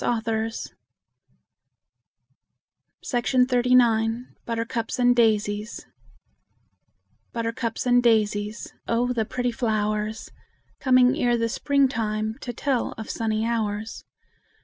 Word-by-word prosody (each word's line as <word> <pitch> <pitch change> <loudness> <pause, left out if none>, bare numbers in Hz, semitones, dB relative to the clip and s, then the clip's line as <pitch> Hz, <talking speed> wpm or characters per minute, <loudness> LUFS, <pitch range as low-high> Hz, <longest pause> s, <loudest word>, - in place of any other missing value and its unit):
JAMES 225 -1 -2 2.4
HOGG 250 0 +2 1.0
BUTTERCUPS 230 0 -2
AND 245 -1 +4
DAISIES 215 -2 +1 1.5
Buttercups 230 0 -3
and 245 0 +4
daisies, 215 -2 0
Oh, 245 +2 +1
the 225 -3 0
pretty 245 +2 -2
flowers; 215 -2 -2 0.5
Coming 255 -1 +4
ere 245 -5 +2
the 230 0 0
spring 280 +4 +2
time, 215 -3 -2
To 245 - -4
tell 255 +1 -1
of 220 - -6
sunny 220 -1 -1
hours. 220 -2 -2
230 Hz, 90 wpm, -24 LUFS, 220-245 Hz, 2.4 s, AND